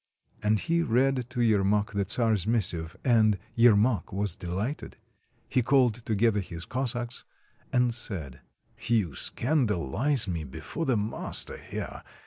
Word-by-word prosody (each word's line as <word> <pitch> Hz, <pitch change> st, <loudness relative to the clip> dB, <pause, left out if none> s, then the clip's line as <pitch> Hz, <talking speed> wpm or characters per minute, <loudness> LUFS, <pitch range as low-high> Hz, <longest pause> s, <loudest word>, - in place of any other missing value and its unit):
And 105 Hz, 0 st, +2 dB
he 170 Hz, +8 st, +1 dB
read 125 Hz, -1 st, +1 dB
to 125 Hz, -1 st, -2 dB
Yermak 105 Hz, -1 st, +2 dB
the 100 Hz, -1 st, -1 dB
czar's 110 Hz, -5 st, +1 dB
missive, 85 Hz, -8 st, -1 dB
and 110 Hz, -5 st, +4 dB, 0.2 s
Yer 115 Hz, -2 st, +6 dB
mak 110 Hz, +1 st, +1 dB
was 100 Hz, -2 st, -2 dB
dehghted; 95 Hz, -, -4 dB, 0.5 s
he 130 Hz, -, +1 dB
called 120 Hz, -2 st, +2 dB
together 110 Hz, 0 st, +2 dB
his 85 Hz, -3 st, -7 dB
Cossacks, 120 Hz, -2 st, -3 dB, 0.5 s
and 125 Hz, -1 st, +2 dB
said: 80 Hz, -, -5 dB, 0.2 s
— -, -, -31 dB
"You 105 Hz, -10 st, +2 dB
scandalize 120 Hz, -, +1 dB
me 85 Hz, -4 st, -3 dB
before 80 Hz, -, -5 dB
the 125 Hz, -4 st, +2 dB
master 105 Hz, +2 st, 0 dB
here. -, -, -7 dB
110 Hz, 135 wpm, -28 LUFS, 95-125 Hz, 0.5 s, Yer